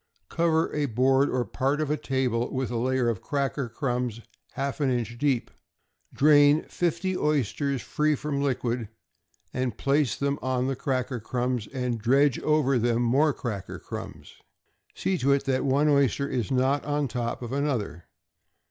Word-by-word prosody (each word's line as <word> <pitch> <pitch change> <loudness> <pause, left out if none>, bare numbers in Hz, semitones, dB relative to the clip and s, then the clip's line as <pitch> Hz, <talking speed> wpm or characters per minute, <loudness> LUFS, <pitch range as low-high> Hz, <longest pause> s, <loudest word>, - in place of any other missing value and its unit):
Cover 165 -1 +1
a 150 -1 0
board 130 +3 +3
or 125 -1 0
part 135 +8 -1
of 150 -1 -1
a - - +2
table 130 -5 -1
with 130 -2 -2
a - - -3
layer 130 +1 +1
of 115 -5 -1
cracker 140 -2 -2
crumbs 125 -1 -2 0.3
half 140 +2 -3
an 140 - +2
inch 120 -2 -1
deep. 135 -4 0 0.6
Drain 145 +1 +5
fifty 175 +2 -1
oysters 140 - 0
free 150 0 +1
from 140 0 -3
liquid, 120 -4 -1 0.9
place 140 -1 +1
them 140 +1 -1
on 130 -1 0
the 135 0 -1
cracker 130 -1 -2
crumbs, 125 0 -2
and 125 -3 -3
dredge 135 +3 +3
over 150 -4 +2
them 120 +1 +1
more 140 +6 +3
cracker 110 -8 -5
crumbs. - - -8 0.6
See 190 -2 -1
to 140 +1 +3
it 140 - +1
that 130 0 0
one 140 +3 +3
oyster 140 -1 +2
is 125 -4 -2
not 135 +2 +1
on 145 -1 -1
top 120 0 -3
of 120 - -6
another. 130 - -2
135 Hz, 155 wpm, -26 LUFS, 125-145 Hz, 0.9 s, Drain